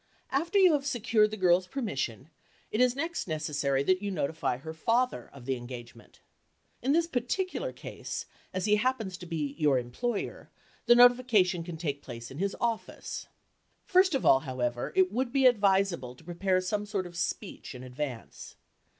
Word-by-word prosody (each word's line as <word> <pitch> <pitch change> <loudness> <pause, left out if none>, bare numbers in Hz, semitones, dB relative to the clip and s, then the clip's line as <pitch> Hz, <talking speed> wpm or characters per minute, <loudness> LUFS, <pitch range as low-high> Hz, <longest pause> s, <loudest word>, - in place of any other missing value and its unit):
After 335 +9 +1
you 370 -4 +7
have 290 -2 +1
secured 230 -4 +2
the 215 - -6
girl's 180 -1 +3
permission, 155 - -3 0.4
it 215 - +1
is 250 0 +4
next 325 - -3
necessary 145 -4 0
that 185 +5 +2
you 205 - -2
notify 155 -6 -1
her 160 +5 -8
father 230 - 0
of 135 -3 -13
the 135 0 0
engagement. 120 -1 -10 0.6
In 265 - +1
this 330 +3 +3
particular 355 - -2
case, - - -6 0.3
as 185 +1 -2
he 210 0 +4
happens 225 -5 -1
to 180 - -9
be 150 -4 -2
your 145 -4 +4
employer, 125 - -3 0.4
the 240 - +8
notification 240 -8 +5
can 170 -1 -7
take 145 -4 -3
place 120 -2 -8
in 135 - -8
his 200 +1 -1
office. 230 -2 -3 0.6
First 370 -3 +4
of 265 - -1
all, 130 - +7
however, 125 -1 -3
it 185 -1 +4
would 245 +2 -1
be 270 0 +3
advisable 195 - +3
to 145 - -18
prepare 185 +2 0
some 205 +3 -2
sort 200 -3 -2
of 175 -1 -10
speech 180 -3 -4
in 125 - -8
advance. 130 -1 -6
185 Hz, 170 wpm, -29 LUFS, 145-240 Hz, 0.6 s, the